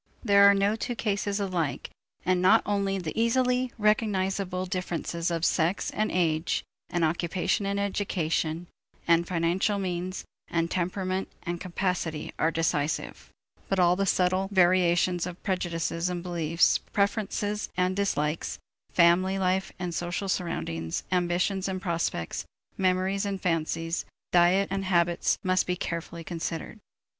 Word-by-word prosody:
There 200 -3 +7
are 200 - +5
no 200 +2 +2
two 240 +2 -3
cases 205 -2 -1
alike 180 -7 -2 0.3
and 185 0 +2
not 200 +5 +5
only 200 -1 0
the 170 -4 -4
easily 250 +2 +2
recognizable 195 -3 +1
differences 175 -2 -2
of 170 -1 0
sex 170 +3 +1
and 215 +1 0
age, 165 -2 +1 0.3
and 175 -2 +1
occupation 175 +4 0
and 200 0 -1
education, 175 -5 -1 0.4
and 170 0 +4
financial 180 +4 +1
means, 185 -1 -3 0.2
and 170 0 -1
temperament 185 +1 -1 0.2
and 175 -1 -4
capacity 175 -4 -2
are 160 - +3
decisive, 160 -2 -1 0.4
but 195 - +1
all 175 -1 +4
the 195 +1 0
subtle 185 +1 +2
variations 180 -1 +3
of 180 0 -9
prejudices 175 -2 -1
and 175 -1 -4
beliefs, 170 -1 +2
preferences 210 0 -1
and 185 +1 +1
dislikes, 160 -6 -1 0.3
family 185 +2 +4
life 190 0 0
and 180 -2 -4
social 175 +3 -2
surroundings, 80 - -2
ambitions 180 +2 +1
and 190 -1 -2
prospects, 170 - -2 0.3
memories 190 +1 +1
and 200 -1 -2
fancies, 165 -1 -1 0.3
diet 180 +3 +4
and 195 0 -1
habits 175 -2 +2
must 185 -1 +2
carefully 170 0 -4
be - - -12
considered. 165 +4 -5
180 Hz, 130 wpm, -27 LUFS, 170-195 Hz, 0.4 s, There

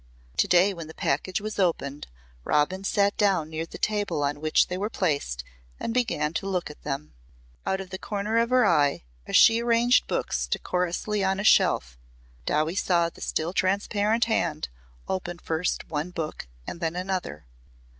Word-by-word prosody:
To - - +3
day 180 +3 +5
when 165 -3 -7
the 160 - -11
package 185 +2 -1
was 215 0 -5
opened 150 -6 0 0.4
Robin 165 - +1
sat 200 0 +2
down 185 -7 +2
near 160 +1 -3
the - - -9
table 205 -8 0
on 145 +1 -1
which 155 0 +3
they 180 - -3
were 200 +3 -2
placed 140 - -1 0.4
and 230 - -3
began 220 -11 0
to 195 +3 -2
look 180 -5 -2
at 150 - -16
them. 145 +1 -5 0.5
Out 190 - +1
of 190 -1 -8
the 190 - -5
corner 210 +2 -1
of 230 0 +1
her 255 -2 +4
eye 145 - +3 0.2
as - - -2
she 225 0 +7
arranged 235 +1 +3
books - - -1
decorously 180 - -1
on 190 0 +1
a - - -2
shelf 60 - +3 0.5
Dowie 155 +2 +1
saw 175 -3 +2
the - - -16
still 165 +3 -2
transparent 205 +4 +1
hand 170 -9 -1 0.4
open 175 -2 -3
first 165 0 -2
one 155 +2 -3
book 160 - -5 0.2
and - - -6
then 165 -1 -2
another. 180 - -3
180 Hz, 175 wpm, -26 LUFS, 155-205 Hz, 0.5 s, she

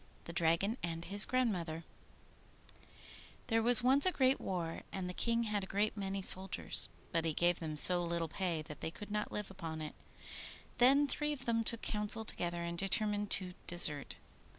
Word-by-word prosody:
THE 170 - -8
DRAGON 175 +6 0
AND 165 0 -5
HIS 200 +2 +1
GRANDMOTHER 180 -11 -2 1.6
There 225 -1 +1
was 240 +1 +5
once 265 +3 +4
a - - +3
great 265 -4 +1
war, 170 -3 -4
and 190 -2 -5
the 180 - -5
King 235 +4 0
had 210 -3 -2
a - - -7
great 205 +3 -1
many 195 -1 -4
soldiers, 190 0 +1 0.2
but 165 -1 0
he 165 -1 -1
gave 175 0 +1
them 155 -2 -5
so 175 +3 +7
little 170 -1 -2
pay 170 -2 -3
that 150 -1 -11
they - - -3
could 205 +5 -10
not 210 0 -3
live 210 -2 -4
upon 165 -4 -7
it. 155 -1 -6 0.9
Then 275 +4 +5
three 295 +2 -1
of 265 -2 -7
them 230 -1 0
took 230 0 -4
counsel 210 +1 +2
together 175 -3 -3
and 170 0 -4
determined 205 +1 -1
to 185 -2 -1
desert. 150 -5 +5
195 Hz, 180 wpm, -34 LUFS, 170-225 Hz, 1.6 s, so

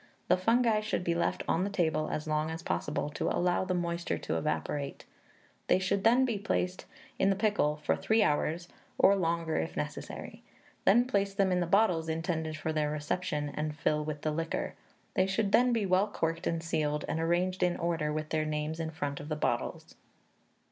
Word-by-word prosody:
The - - +6
fungi 225 +3 +3
should 215 -3 -2
be 170 - +1
left 170 0 0
on 175 - +2
the 200 - -1
table 160 -6 0
as 150 - -3
long 155 0 0
as 160 0 -5
possible, 150 0 -2
to - - -1
allow 180 +1 +1
the 185 -1 0
moisture 170 0 -1
to - - -3
evaporate; 80 - -2 0.6
they - - +5
should 190 +1 0
then 245 +4 +5
he 230 -5 -1
placed 185 -2 -1 0.3
in 195 - +4
the 195 - +3
pickle 205 -8 +1
for - - +2
three 220 0 +2
hours, 165 +1 0 0.3
or 200 - +6
longer, 165 -3 0
if 80 - -3
necessary; - - -5 0.4
then 235 +5 +6
place 200 -5 0
them 195 -2 +2
in 180 - +2
the 175 - 0
bottles 175 -4 +3
intended 160 -1 -2
for 160 0 -2
their 150 -1 +1
reception, 150 0 -2
and 150 0 -3
fill 150 -1 +1
with 150 -1 -5
the 155 - +1
liquor. 165 +1 -2 0.4
They 185 - +2
should 195 +1 0
then 250 +3 +5
be 225 -3 +1
well 190 +2 +3
corked 165 -4 -2
and 165 -1 -1
sealed, 150 -3 -1
and 160 - -1
arranged 175 +3 +1
in 180 -1 +2
order, 165 -3 -1
with 155 0 -3
their 155 -1 +1
names 155 +1 -2
in 160 -1 -2
front 145 -3 -4
of 145 - -8
the 155 - -1
bottles." 150 - -2
170 Hz, 195 wpm, -30 LUFS, 155-190 Hz, 0.6 s, The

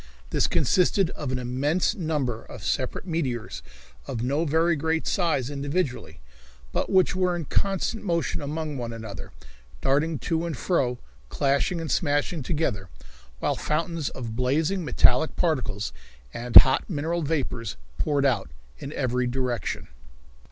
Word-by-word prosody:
This - - +2
consisted 185 0 +2
of 145 -4 -4
an 130 - 0
immense 135 +10 0
number 150 - -2
of - - -11
separate - - -1
meteors 125 - -2 0.5
of 115 - -3
no 140 +6 +1
very 165 +3 +3
great 160 +2 0
size 155 -8 0
individually, 140 - -2 0.5
but - - -1
which 190 0 +4
were 180 -1 +1
in 170 -3 -4
constant 195 - 0
motion 170 -9 -1
among 150 0 -3
one 120 -1 -4
another, 110 -3 -8 0.5
darting 150 - +1
to 165 +2 -1
and 160 -6 -4
fro, 125 -8 +1 0.3
clashing 140 +5 +1
and 165 -2 -3
smashing 145 0 +1
together, 125 - -1 0.5
while - - 0
fountains 165 0 -1
of 115 -3 -6
blazing 155 +9 +1
metallic 130 +1 +3
particles 125 - -1 0.4
and 120 0 -6
hot 130 - +9
mineral 165 +1 -1
vapors 135 - -2 0.2
poured 140 - +1
out 115 - +1 0.3
in 140 - -6
every 125 -2 0
direction. 125 - -2
145 Hz, 135 wpm, -26 LUFS, 125-165 Hz, 0.5 s, hot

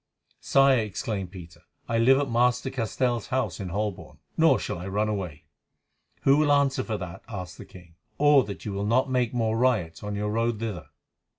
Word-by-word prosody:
"Sire," 135 -2 +4
exclaimed 105 -2 -3
Peter, 85 -3 -12 0.3
"I 115 0 0
live 130 +3 +5
at 140 0 0
Master 125 +2 +1
Castell's 120 -1 -1
house 130 -2 -1
in 95 -3 -5
Holborn, 100 +1 -4 0.2
nor - - +5
shall - - -4
I 90 - -6
run 105 +2 0
away." 95 -8 -4 0.8
"Who 135 +1 +5
will 150 -1 +3
answer 140 -2 +2
for 110 -3 -3
that," 90 -3 -7
asked 90 -4 -7
the - - -9
king, 90 -2 -15 0.2
"or 145 -2 +5
that 95 -4 -8
you 105 - -3
will 100 +1 -2
not 130 +4 +2
make 125 -3 +1
more 115 -2 0
riots 110 -10 +1
on 105 0 -4
your 105 +1 -2
road 115 +1 0
thither?" 105 -7 -5
110 Hz, 190 wpm, -26 LUFS, 100-130 Hz, 0.8 s, live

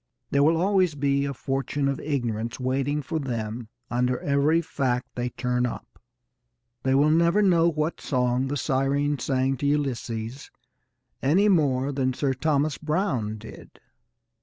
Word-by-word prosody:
There 140 - +3
will 160 +3 +4
always 185 -2 +2
be 140 0 +1
a 140 - -2
fortune 135 +2 -2
of 140 -1 -1
ignorance 120 -6 -2
waiting 135 +3 -1
for 160 +4 -2
them 115 -4 -4 0.2
under 125 +1 +1
every 145 +3 +2
fact 125 -6 -2
they 125 0 -2
turn 125 0 -1
up. 120 - -9 0.8
They 130 0 +1
will 145 +3 +4
never 170 +5 +3
know 170 -3 +4
what 155 0 -2
song 125 -1 0
the 145 +2 -2
Sirens 140 +2 0
sang 135 -1 +1
to 140 - -1
Ulysses 130 -4 -2 0.7
any 185 +10 +3
more 140 -6 +2
than 130 -2 -1
Sir 135 -1 0
Thomas 145 +1 0
Browne 150 - -1
did. 110 +1 -13
140 Hz, 145 wpm, -25 LUFS, 125-150 Hz, 0.8 s, will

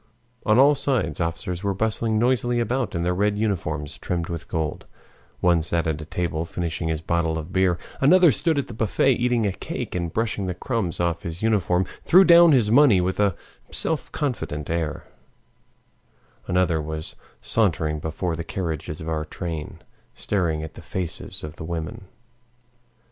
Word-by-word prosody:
On 110 +1 +5
all 140 +3 +7
sides 130 -9 -1
officers 85 +1 -3
were 100 -1 -1
bustling 110 +1 0
noisily 120 0 +2
about 120 0 -1
in 85 - -1
their 90 +1 +1
red 105 +2 +1
uniforms 80 -9 -2
trimmed 85 -2 -3
with 85 -1 -5
gold; 80 -3 -3 0.5
one 85 -2 +4
sat 85 +1 0
at 80 -1 -1
a - - -7
table 80 0 -2
finishing 85 -1 -3
his 80 -1 -1
bottle 80 -1 0
of 80 +3 -7
beer, 95 -2 +3 0.2
another 175 +4 +6
stood 155 - +1
at 140 - 0
the 120 - -9
buffet 110 +4 +2
eating 120 -2 +1
a 100 - +1
cake, - - -5
and 85 -2 -2
brushing 110 -2 -1
the 90 - -3
crumbs 110 -8 -2
off 85 -1 0
his 85 +3 -6
uniform, 95 -4 +2 0.2
threw 185 +3 +7
down 170 -2 +8
his 120 -7 +3
money 125 -6 +6
with 90 +2 -1
a 100 -4 +3 0.3
self 160 -2 -2
confident 100 - -3
air; 80 -3 -2 1.4
another 90 -3 +2
was 80 +1 -5 0.2
sauntering 80 -8 0
before 80 +3 -3
the 85 - -4
carriages 80 -4 -4
of 80 - -7
our 80 -1 -1
train, 80 -1 -6 0.3
staring 85 -6 -1
at 80 0 -7
the - - -11
faces 85 +1 -5
of 75 +1 -7
the - - -7
women. 80 +2 -5
90 Hz, 170 wpm, -24 LUFS, 80-110 Hz, 1.4 s, down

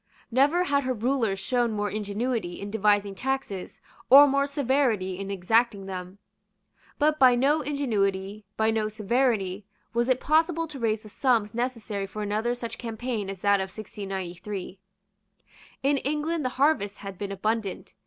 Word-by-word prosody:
Never 290 +8 +3
had 285 -5 +1
her 255 0 0
rulers 230 -3 0
shown 235 +3 0
more 205 -1 -1
ingenuity 210 -1 -2
in 200 0 -6
devising 205 -2 +2
taxes 255 -4 -4 0.3
or 280 +3 +10
more 280 0 +2
severity 250 -9 0
in 195 0 -5
exacting 200 +2 +1
them; 185 0 -7 0.8
but 305 +1 +2
by 255 -2 +7
no 285 +5 +3
ingenuity, 210 -8 -1
by 220 0 +3
no 220 -1 0
severity, 215 -3 0 0.3
was 235 +2 +1
it 255 0 +3
possible 325 +3 +2
to 285 -3 -8
raise 220 -2 0
the 215 - -13
sums 225 -3 +1
necessary 230 -5 -3
for 210 +2 -5
another 215 +4 -1
such 235 -2 -6
campaign 230 -3 -3
as 195 -2 -7
that 200 -1 +4
of 190 0 -3
1693. 195 -2 -6 1.0
In 280 +1 +3
England 300 +3 -1
the 255 - 0
harvest 265 -8 +2
had 195 -2 -8
been 200 -1 -4
abundant. 215 0 -2
220 Hz, 155 wpm, -26 LUFS, 200-265 Hz, 1.0 s, or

